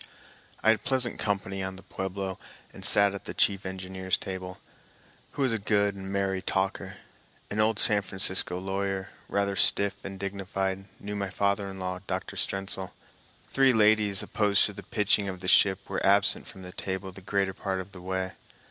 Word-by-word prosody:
I 110 - +5
had 110 - 0
pleasant 130 -3 0
company 95 -2 -1
on 95 0 -4
the 95 - -12
Pueblo 95 0 -4 0.3
and 95 - -10
sat 100 +1 +6
at 100 - -7
the - - -6
chief 95 -1 +2
engineer's 95 0 -2
table, 95 -1 -6 0.8
who 140 - -1
was 130 -3 +2
a 110 - -1
good 100 0 +2
and 95 0 -7
merry 95 -1 0
talker. 95 0 -2 0.5
An 105 - -2
old 110 0 +3
San 105 -1 +5
Francisco 95 -2 +1
lawyer, 95 0 -2 0.2
rather 100 -1 0
stiff 100 0 +3
and 95 -1 -7
dignified, 95 0 -3
knew 105 0 -5
my 100 -1 -2
father 100 +1 0
in 95 - -8
law, 90 -1 -3
Dr. 95 0 -3
Strentzel. 95 -1 -2 0.6
Three 135 -1 +5
ladies, 105 -3 +4
opposed 105 -2 +3
to 105 - -3
the 100 - -8
pitching 105 -1 +1
of 95 -1 -6
the 90 - -6
ship, 95 0 +4
were 95 - -3
absent 100 +1 +3
from 95 -4 -10
table 95 +1 -4
the 95 - -12
greater 100 0 0
part 95 -1 -3
of 95 +1 -7
the 90 - -11
way. 95 0 -2
95 Hz, 180 wpm, -28 LUFS, 95-100 Hz, 0.8 s, sat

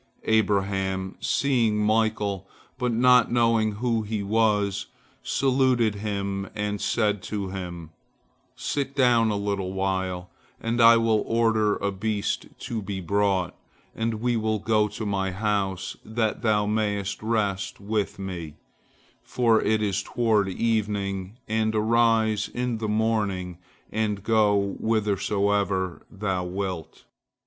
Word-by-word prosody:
Abraham, 95 -3 +1
seeing 120 -6 +1
Michael, 105 -2 0 0.3
but 125 -2 0
not 125 0 +5
knowing 115 -2 +2
who 115 +1 0
he 105 -1 -3
was, 105 -2 +1 0.3
saluted 130 -4 +2
him 100 -1 -3
and 105 -1 -2
said 105 -4 +1
to 100 -1 -4
him, 90 -4 -6 0.6
"Sit 140 -1 -3
down 120 -4 +4
a 105 - 0
little 100 -2 -2
while, 95 -2 -2 0.3
and 115 +1 0
I 115 0 +8
will 115 -2 +2
order 110 -2 +2
a 100 - -2
beast 100 +1 -2
to 115 -2 -3
be 100 -1 -4
brought, 95 0 +1 0.4
and 115 0 -1
we 120 +2 0
will 110 -1 0
go 105 0 +2
to 110 +1 -6
my 100 -2 0
house, 95 -1 -1
that 110 0 -1
thou 105 -3 +2
mayest 105 -2 -1
rest 105 -3 -1
with 105 0 -2
me, 90 -6 -6 0.7
for 115 -3 +2
it 110 0 +1
is 100 -1 0
toward 110 -2 +1
evening, 100 -2 -1
and 110 0 0
arise 110 -1 +2
in 125 -2 -2
the 110 - -2
morning 105 -5 0 0.3
and 105 -2 -1
go 105 -3 +2
whithersoever 100 -3 0
thou 95 -3 -2
wilt." 90 -2 -5
105 Hz, 125 wpm, -25 LUFS, 100-110 Hz, 0.7 s, I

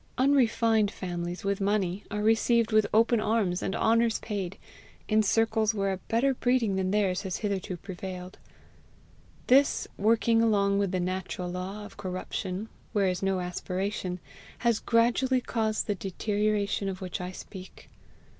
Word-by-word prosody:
Unrefined 230 -5 +3
families 175 -2 -5
with 200 0 -1
money 195 -1 0
are 210 -1 -2
received 225 +1 +3
with 215 -1 +4
open 230 +1 +4
arms 215 -5 0
and 190 - -2
honours 230 0 +3
paid, 195 -4 -4 0.5
in 215 0 +3
circles 220 +1 +2
where 195 -1 0
a - - -3
better 235 +7 +1
breeding 245 -5 +1
than 190 -1 0
theirs 195 -2 +1
has 190 -3 -3
hitherto 195 -3 -3
prevailed: 185 0 -8 1.1
this, 275 +3 +4
working 225 +2 +3
along 200 -3 +3
with 200 -2 0
the 185 - 0
natural 180 0 -3
law 190 +4 -5
of - - -13
corruption 185 +2 -4 0.3
where 200 -3 +2
is 180 0 -2
no 195 -1 +1
aspiration, 180 +1 -3 0.4
has 235 -3 +1
gradually 245 +3 +2
caused 220 -3 -1
the 205 - 0
deterioration 205 +1 -1
of 190 -1 -5
which 180 -1 -5
I 180 0 -4
speak. 185 0 -11
205 Hz, 145 wpm, -28 LUFS, 185-225 Hz, 1.1 s, with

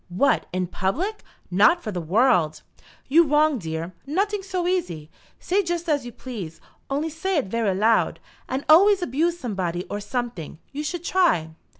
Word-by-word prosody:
"What, 235 +11 +1
in 185 0 -1
public! 290 - -2 0.3
Not 210 - +4
for 215 - -4
the 180 -3 -3
world!" 170 - +2 0.4
"You 325 +5 +6
wrong 295 -1 +3
dere. 165 0 -5
Noting 400 +7 0
so 370 -2 -2
easy. 170 - -2 0.3
Say 390 +3 +1
just 345 -2 -3
as 290 -5 0
you - - -7
please, 210 -10 -8 0.3
only 295 +4 -1
say 355 +4 -1
it 285 - +1
vera 205 -1 0
loud. 220 +3 +2 0.3
And 265 +2 -3
alvays 380 +4 +6
abuse 330 +5 0
somebody 185 - -3
or 205 - -2
someting. 220 - -4
You 290 +2 -4
s'ould 340 +3 -4
try." 335 - +2
260 Hz, 165 wpm, -24 LUFS, -, 0.4 s, You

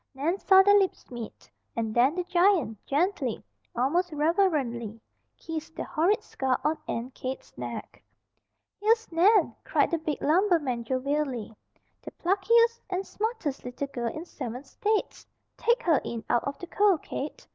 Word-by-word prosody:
Nan 325 +8 -1
saw 385 -1 +6
their 405 +1 +6
lips 385 -8 -2
meet, 235 -3 -8 0.3
and 225 -2 -2
then 255 +7 +4
the 360 - -1
giant 355 - +2
gently, 290 - 0 0.3
almost 330 +9 +1
reverently, 295 - 0 0.4
kissed 325 0 -6
the - - -3
horrid 345 +6 +1
scar 260 -1 -1
on 310 +1 +2
Aunt 240 +3 -4
Kate's 260 +1 -6
neck. - - -7 0.8
"Here's 450 +1 +2
Nan!" 365 +2 +4
cried - - +1
the 335 - +1
big 305 -2 -3
lumberman 310 - +2
jovially. 260 -3 -2 0.5
"The - - -8
pluckiest 460 +6 +3
and 380 +1 -2
smartest 435 - -3
little 250 +3 -4
girl 235 -4 -3
in 315 +6 -7
seven 250 -6 -6
states! 420 +9 -2 0.3
Take 480 +1 +1
her 320 - +3
in 230 -1 -5
out 240 - +2
of 280 - -3
the - - -7
cold, 390 -2 +2
Kate. 290 - -6
315 Hz, 150 wpm, -27 LUFS, 255-385 Hz, 0.8 s, saw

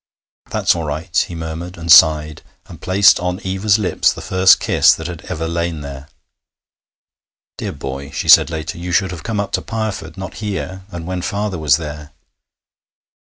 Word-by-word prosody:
'That's - - +1
all 85 - -3
right,' 80 +4 -1
he 85 - -8
murmured, 80 +2 -6
and 85 0 -2
sighed, 75 0 +5 0.2
and - - -13
placed 95 +2 +4
on 90 +1 -3
Eva's 95 +2 +1
lips 105 -4 +1
the - - -8
first 95 0 +4
kiss - - +4
that 80 - -8
had 85 -2 -6
ever 80 +1 -4
lain 85 -1 -3
there. 70 -1 -9 1.5
'Dear - - -4
boy,' 70 +1 -7
she - - -5
said - - +7
later, 80 +1 -5
'you 90 +1 -5
should 95 0 +1
have 85 -3 -7
come 110 -2 -3
up 100 -1 -3
to - - -1
Pireford, 110 -3 -5
not 95 0 -7
here, 95 -2 -5
and 85 -1 -7
when 90 0 -4
father 100 +1 -3
was 75 -2 +3
there.' 75 -2 -8
85 Hz, 175 wpm, -18 LUFS, 80-95 Hz, 1.5 s, said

